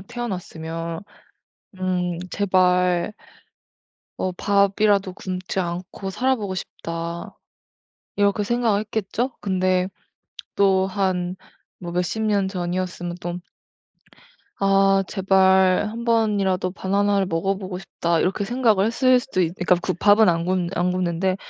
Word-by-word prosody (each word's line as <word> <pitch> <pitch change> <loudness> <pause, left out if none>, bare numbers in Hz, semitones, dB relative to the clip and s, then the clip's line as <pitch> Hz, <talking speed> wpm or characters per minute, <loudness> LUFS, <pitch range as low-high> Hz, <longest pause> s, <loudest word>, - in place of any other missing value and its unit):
태어났으면 170 -7 -5 0.8
음 180 -2 -1
'제발' 180 -1 +2 1.0
'어 185 - -1
밥이라도 200 0 +2
굶지 185 0 -5
않고 180 +2 -5
살아 260 +6 +1
보고 200 -4 -4
싶다.' 170 -1 -6 0.8
이렇게 205 0 +2
생각을 225 -2 +1
했겠죠. 220 +4 -2
근데 185 -1 +1 0.7
또 190 -1 +3
한 185 -2 -1 0.4
뭐 175 -1 -6
몇 180 - +1
십 220 +5 -3
년 205 -3 +1
전이었으면 180 -1 -3
또 175 +1 -4 1.2
'아 195 0 +4
제발 190 0 +3
1 230 +2 -6
번이라도 205 -5 +1
바나나를 200 +1 +1
먹어 190 +3 -1
보고 185 -2 -6
싶다.' 170 -2 -1
이렇게 195 +3 0
생각을 220 -3 +2
했을 255 +2 +4
수도 245 -6 -2
있 170 -2 +1
그러니까 180 0 +2
굶 - - -1
밥은 205 +3 +5
안 170 -1 +1
굶 180 -1 0
안 180 +1 +1
굶는데 185 +1 0
190 Hz, 245 characters per minute, -23 LUFS, 180-205 Hz, 1.2 s, 밥은